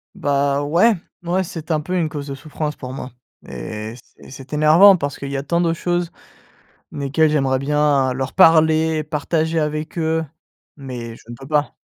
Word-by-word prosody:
Bah 140 0 0
ouais, 170 +11 +4 0.3
n 170 - -7
ouais, 185 +2 +1
c'est 165 -3 -7
un 155 -1 +1
peu 185 +4 -3
une 165 -3 +1
cause 150 -2 -6
de 140 - -5
souffrance 150 +1 -5
pour 130 0 -8
moi 130 -1 -7 0.4
et 105 - -6
c'est - - -18
c'est 135 +2 -11
énervant 160 +7 +7
parce 145 -5 -4
qu'il 140 0 -6
y 140 - -2
a - - -2
tant 170 +4 0
de 170 -1 +1
choses, 175 0 -2 0.8
desquelles 145 +2 +1
j'aimerais 135 -3 +1
bien 140 -1 +1
leur 130 +1 -4
parler, 160 -2 +4
partager 160 +2 -1
avec 155 +2 -3
eux, 160 0 0 0.5
mais 125 -5 -7
je - - -18
ne 120 - -7
peux 135 +3 -12
pas. 150 0 0
150 Hz, 185 wpm, -20 LUFS, 135-160 Hz, 0.8 s, énervant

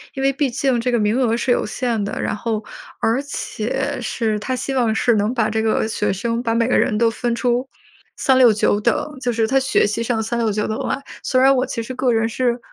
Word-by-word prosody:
因 270 - -3
为 275 0 +3
毕 280 -1 0
竟 255 -1 0
这 250 +1 0
个 240 - +2
名 215 +4 +1
额 235 -2 +2
是 245 +1 0
有 - - +2
限 235 -5 -1
的， 200 - -4
然 - - -1
后 220 0 -3 0.4
而 230 +5 +1
且 270 0 -3
是 220 -3 -1
它 255 +4 -2
希 270 +2 -3
望 235 -4 +2
是 240 - +3
能 210 +4 +1
把 220 -2 +1
这 220 0 0
个 220 0 +1
学 210 -2 -1
生 230 +5 -2
把 230 -2 -1
每 230 0 +2
个 - - +2
人 210 - +1
都 230 0 +3
分 235 0 -2
出 245 +2 0 0.5
3 265 -1 +3
6 245 -3 +7
9 205 0 +1
等， 260 +5 -1
就 245 - 0
是 225 -1 +1
他 270 +2 +3
学 265 0 +2
习 210 +3 -2
上 230 -1 0
3 235 +2 -2
6 225 -2 +1
9 210 +1 -1
等 215 - -2
啦。 275 - -3 0.2
虽 255 - +1
然 270 +1 +5
我 255 +1 +1
其 230 - -4
实 255 - -6
个 255 -1 +1
人 225 0 +2
是 245 +1 -1
235 Hz, 240 characters per minute, -20 LUFS, 220-255 Hz, 0.5 s, 6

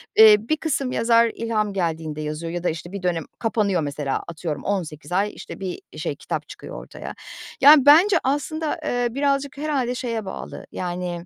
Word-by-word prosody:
Eee, 220 -1 +9
bir 235 +9 -1
kısım 275 -5 -1
yazar 230 -1 +4
ilham 215 -3 -1
geldiğinde 160 -4 -2
yazıyor 155 +2 -4
ya 175 0 -4
da, - - +2
işte, 165 +2 -6
bir 200 -1 -6
dönem 170 -3 0 0.2
kapanıyor 210 -6 +1
mesela 145 -2 -2
atıyorum 160 -3 -5
18 175 -5 -3
ay, 200 +3 +1
işte, - - -9
bir 190 - -5 0.2
şey - - -3
kitap - - -5
çıkıyor - - -9
ortaya. - - -8 0.5
Yani, 285 -1 +8
bence 345 +7 +7
aslında, 295 +3 -1
eee, 245 0 0
birazcık 280 +1 0
herhâlde 275 -5 -1
şeye 230 -4 -3
bağlı, 190 - -7
yani, 175 -1 -4
210 Hz, 170 wpm, -23 LUFS, 170-265 Hz, 0.5 s, Eee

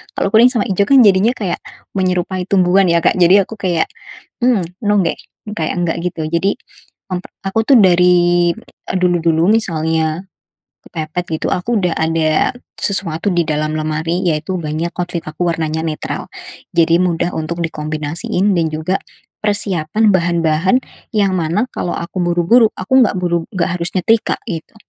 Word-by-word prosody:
Kalau - - 0
kuning 240 +3 +7
sama 235 -5 -1
hijau, 195 0 +1
kan, 275 -1 +7
jadinya 200 +3 +4
kayak 190 -7 -3 0.4
menyerupai 185 -1 -1
tumbuhan, 185 0 +3
ya, 170 - +3
Kak, - - +3
jadi 185 +2 +5
aku 225 - -8
kayak, 175 -4 0 0.6
mmm, 240 -6 +3 0.2
no, 205 - +3
deh, - - -1 0.4
kayak 160 -1 -1
enggak, 175 -2 -1
gitu. 165 -2 -4
Jadi, 170 +5 +1 0.6
m 180 - -2 0.2
aku, 195 +3 0
tuh, 270 -3 +6
dari 175 -1 +4 0.4
a - - -2
dulu-dulu 170 -2 +2
misalnya 160 -5 0 0.6
kepepet 165 +2 -4 0.2
gitu, - - 0
aku 225 +6 0
udah 175 -2 0
ada 160 +5 +1 0.2
sesuatu 195 -4 -1
di 175 - +3
dalam 155 0 -2
lemari, 160 +3 -2
yaitu 155 +3 -1
banyak 160 +1 -3
outfit 175 -1 -3
aku 155 +3 -3
warnanya 160 -1 -2
netral, 155 -1 -4 0.5
jadi 170 0 +4
mudah 175 0 -1
untuk 160 +2 -4
dikombinasiin, 155 +5 -2
dan 165 - +1
juga 160 +5 -2 0.4
persiapan 205 -1 +1
bahan-bahan 170 +2 +2 0.4
yang 200 -3 +2
mana 175 +7 0
kalau 175 - -3
aku 170 +2 -5
buru-buru, 175 +7 +3
aku 260 +8 +3
enggak 210 - +1
buru 170 -2 -1
enggak 185 -1 0
harus 170 0 -3
nyetrika, 220 +5 +1
gitu. 165 -1 -6
175 Hz, 150 wpm, -16 LUFS, 160-195 Hz, 0.6 s, kuning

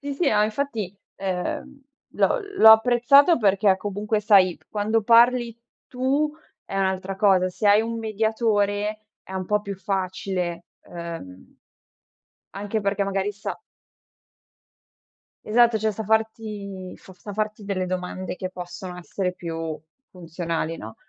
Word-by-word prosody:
Sì, 285 -1 -4
sì, 335 - +1
ma 210 0 +3
infatti, 220 -4 -3 0.2
uhm, 275 +10 -4 0.3
l'ho - - +2 0.2
l'ho 220 - +9
apprezzato 245 +8 +5
perché 200 -2 +3
comunque 205 +2 -2
sai, 195 -4 +4
quando 215 +2 0
parli 235 +1 +4 0.3
tu 275 +4 0 0.3
è - - -6
un'altra 190 0 -1
cosa, 190 -2 +3
se 195 +4 -3
hai 205 +1 +6
un 230 0 -4
mediatore, 215 -1 0 0.2
è - - -12
un 190 -1 -3
po' 210 +3 +1
più 200 -1 -6
facile, 185 -2 -3 0.2
uhm, 165 - -9 1.0
anche 205 +2 -3
perché 200 0 0
magari 195 +1 -1
sa 205 0 -6 1.9
Esatto, 235 +1 +4
cioè, 220 0 0
sa 215 +1 -5
farti 210 -3 -2
f - - -17
sa 205 - -9
farti 215 0 -3
delle 190 -2 -2
domande 185 0 -4
che 185 - -4
possono 180 0 -8
essere 180 +1 -3
più 165 -3 -5 0.3
funzionali, 165 -2 -4
no? 110 -4 -9
205 Hz, 130 wpm, -24 LUFS, 185-220 Hz, 1.9 s, l'ho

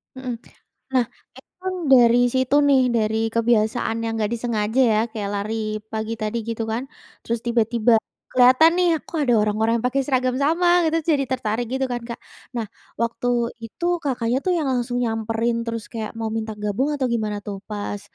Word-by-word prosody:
Hmm. 255 -2 -4 0.6
Nah, 250 -2 +3 0.3
itu - - -17
kan 375 0 -2 0.2
dari 240 -2 +7 0.2
situ 260 +2 +2
nih, 270 -2 +5
dari 220 -1 +1 0.2
kebiasaan 230 0 +1
yang 225 - -2
nggak 215 +1 0
disengaja 225 0 -1
ya, 215 - +3
kayak 205 -2 -4
lari 205 +2 -2 0.4
pagi 220 0 -3
tadi 215 +2 -1
gitu 230 0 -2
kan. 235 +4 -2 0.4
Terus 235 0 -1
tiba-tiba 235 0 +2 0.4
kelihatan 255 +6 +6
nih, 360 - +4 0.2
"Kok 335 - -6
ada 240 - +4
orang-orang 215 +2 +1
pakai 265 +2 +1
seragam 255 -2 +1
sama?" 335 +4 +2 0.2
gitu, 320 - +1 0.2
jadi 280 -2 +1
tertarik 235 -1 -1
gitu 265 0 0
kan, 240 0 -2
Kak. 235 - -5 0.4
Nah, 230 -2 -1 0.4
waktu 235 +1 -1 0.4
itu 285 +10 -6 0.2
Kakaknya 250 -3 0
tuh 365 - +2
yang 310 - -1
langsung 245 -1 -1
nyamperin 225 +1 -1
terus 230 -2 -3
kayak 220 -2 -4
mau 225 -1 -2
minta 220 0 -4
gabung, 210 +8 0
atau 270 -3 -1
gimana 215 -3 -1
tuh 200 -1 -5
pas 205 -1 -4
235 Hz, 170 wpm, -22 LUFS, 220-255 Hz, 0.6 s, dari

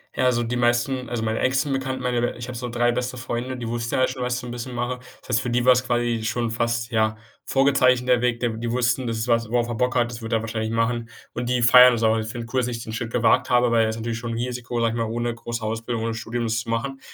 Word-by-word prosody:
Ja, - - +1
also 120 -2 +2
die 120 +1 -2
meisten 120 +2 +1
also 120 -2 -2
meine 110 0 -1
engsten 130 +2 +1
Bekannten, 130 -1 -2
meine 120 -1 0
ich 120 0 -7
habe 125 -2 -6
so 125 +1 -4
3 120 0 +2
beste 125 +1 -3
Freunde, 125 +1 -4
die 120 -2 -5
wussten 115 0 -2
ja - - +1
alle 130 - +4
schon, 130 -1 -4
was 125 0 0
ich - - -2
so 125 - -8
'n - - -6
bisschen 120 +1 -6
mache. 120 +1 -2 0.2
Das - - -19
heißt, 120 -1 +2
für 125 - -3
die 120 +1 +1
war's 125 0 +5
quasi 120 -2 0
schon 115 +2 -1
fast, 115 +1 -1
ja, 110 -1 +1 0.3
vorgezeichnet 130 -2 +3
der 125 -1 +4
Weg, 125 -1 +1
der 120 - 0
die 115 +1 -4
wussten: 125 +1 +1
„Das 115 -1 -2
ist 110 +2 -2
was, 115 -2 +1
worauf 120 0 +1
er 120 - -3
Bock 125 +1 0
hat, 120 -1 +2
das 120 0 -8
wird 115 +1 -4
er 110 - +2
wahrscheinlich 110 0 -3
machen.” 115 0 0 0.2
Und 120 0 -3
die 125 -1 +1
feiern 125 +1 +8
das 115 -1 -1
auch. 110 0 +3
Die 110 - -1
finden 115 +2 -6
es 115 - -15
cool, 130 - +3
dass 120 - -1
ich 115 -2 -4
den 110 - -7
Schritt 115 0 -4
gewagt 115 -2 +3
habe, 125 0 +4
weil 115 -1 +4
es 110 - -2
ist - - -7
natürlich 115 0 -3
schon 115 0 -5
'n - - -2
Risiko, 120 0 -3
sage 115 -1 +2
ich - - -3
mal, 115 -1 -1
ohne 120 0 -1
große 115 0 -5
Ausbildung, 115 +1 -3
ohne 115 0 -1
Studium 115 +1 -3
das 115 0 0
zu 115 - -10
machen. 135 +4 -2
120 Hz, 300 wpm, -23 LUFS, 115-125 Hz, 0.3 s, feiern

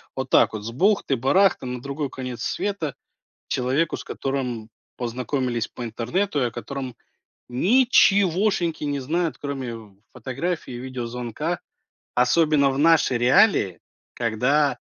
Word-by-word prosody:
Вот - - -4
так - - +4
вот, 105 -1 -5
с 115 - -5
бухты-барахты, 185 - +2
на 125 -1 -4
другой 140 +2 -4
конец 125 -2 -6
света, 180 -9 -2 0.5
человеку, 135 +6 0
с - - -7
которым 125 -5 -3 0.3
познакомились 125 -1 -2
по 120 - -7
интернету, 145 - -1
и 125 - +2
о - - -3
котором 130 -1 -6 0.5
ничегошеньки 190 - +3
не 145 -1 -1
знают, 155 +1 -1
кроме 120 -7 -6 0.2
фотографии, 135 +7 -4
видеозвонка, 125 +5 -4 0.6
особенно 140 +3 +3
в 135 - -3
наши 160 -4 +4
реалии, 120 - +4 0.3
когда 125 +4 +1
135 Hz, 115 wpm, -24 LUFS, 125-165 Hz, 0.6 s, так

